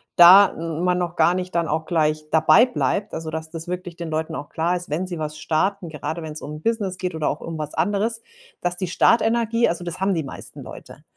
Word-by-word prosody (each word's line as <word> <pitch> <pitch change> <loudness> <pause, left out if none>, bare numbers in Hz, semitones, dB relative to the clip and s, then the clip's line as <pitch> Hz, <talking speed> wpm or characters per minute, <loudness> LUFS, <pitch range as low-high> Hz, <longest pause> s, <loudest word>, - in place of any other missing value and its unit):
da 185 +3 +9
man 170 +2 -1
noch 175 -1 -3
gar 175 - +4
nicht 185 -1 -4
dann 170 -1 +1
auch 160 +1 -1
gleich 155 -2 0
dabei 160 +9 +6
bleibt. 215 -4 -2
Also, 160 -1 -4
dass 160 0 -5
das 165 +1 -8
wirklich 180 -1 -5
den 170 -1 -6
Leuten 160 +1 -3
auch 145 - -7
klar 170 +3 0
ist, 175 0 -6
wenn 165 +6 -2
sie 175 -2 -5
was 155 0 -4
starten, 175 +4 -1
gerade 155 +2 -5
wenn's 155 -1 -7
um 145 - -7
'n - - -13
Business 205 -3 -1
geht 180 -3 -3
oder 155 -2 0
auch 145 - -3
um 165 -1 -6
was 150 -1 -5
anderes, 205 +7 -1 0.4
dass 175 0 -1
die 185 - -2
Start-Energie 230 +4 +2
also, 170 +1 -3
das 175 +1 -5
haben 195 +1 +1
die 165 -3 -1
meisten 135 - -9
Leute. - - -11
170 Hz, 230 wpm, -22 LUFS, 160-185 Hz, 0.4 s, da